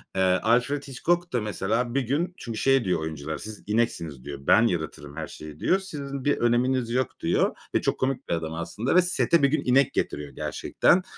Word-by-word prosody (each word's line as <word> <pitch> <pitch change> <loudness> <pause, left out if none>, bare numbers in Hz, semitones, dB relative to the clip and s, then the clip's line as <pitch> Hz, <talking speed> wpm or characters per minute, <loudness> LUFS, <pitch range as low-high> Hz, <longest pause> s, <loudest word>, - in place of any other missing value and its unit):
Eee, 95 - +1
Alfred 120 +10 +2
Hitchcock 175 +6 -1
da 120 - +1
mesela 110 +3 -1
bir 140 - +3
gün 150 +9 -1
Çünkü 115 -2 -6
şey 135 0 +3
diyor 90 -3 +1
oyuncular; 80 -1 -4
siz 110 0 -8
ineksiniz 85 - -1
diyor. 70 -1 -7
Ben 110 +11 +5
yaratırım 75 -5 -4
her 80 - -4
şeyi 75 -1 -10
diyor. 190 - +2
Sizin 140 -8 -6
bir 145 - +3
öneminiz 120 +1 +1
yok 130 0 -1
diyor - - +1 0.2
ve - - +3
çok - - -1
komik 130 0 -1
bir - - +1
adam 80 -1 -2
aslında 100 - -2
ve 180 - +8
sete 170 -3 +2
bir - - +7
gün 155 +3 0
inek 130 +1 +4
getiriyor 75 -1 -2
gerçekten. 180 +1 +2
120 Hz, 200 wpm, -26 LUFS, 85-140 Hz, 0.2 s, ve